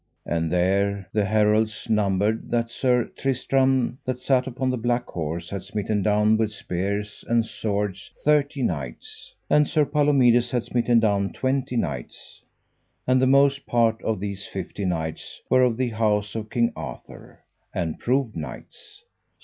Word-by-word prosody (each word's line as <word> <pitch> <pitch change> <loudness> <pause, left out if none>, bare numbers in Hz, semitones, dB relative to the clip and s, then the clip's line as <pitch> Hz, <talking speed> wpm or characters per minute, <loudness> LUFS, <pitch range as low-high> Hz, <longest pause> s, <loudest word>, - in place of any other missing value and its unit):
And 80 -1 -1
there 95 +2 +1
the 105 -2 +2
heralds 110 +1 +1
numbered 105 0 +1
that 115 -1 0
Sir 125 -1 +1
Tristram 130 -1 +1
that 130 -1 -2
sat 130 0 +1
upon 130 0 -1
the 125 - -1
black 120 +1 0
horse 85 +1 -5
had 100 -2 -3
smitten 105 +2 -2
down 105 +2 +3
with 110 -1 0
spears 100 +2 -4
and 115 -1 +2
swords 100 -3 -3 0.2
thirty 145 -2 +2
knights; 70 - -5
and 150 -1 +4
Sir 155 -3 +2
Palomides 135 -5 +3
had 120 -1 -1
smitten 120 -1 +2
down 100 -3 +1
twenty 130 -1 -1
knights, 80 -10 -5 0.6
and 130 0 +3
the 130 - +4
most 140 +1 +3
part 115 -2 +2
of 110 -4 -1
these 100 0 -5
fifty 95 +1 -5
knights 80 -3 -3
were 130 - +5
of 125 -3 +2
the 130 -1 0
house 105 -2 0
of 110 -1 -5
King 115 +1 +1
Arthur, 75 -6 -10 0.3
and 80 -2 -3
proved 125 -2 0
knights. 425 -1 -9
110 Hz, 150 wpm, -24 LUFS, 100-130 Hz, 0.6 s, were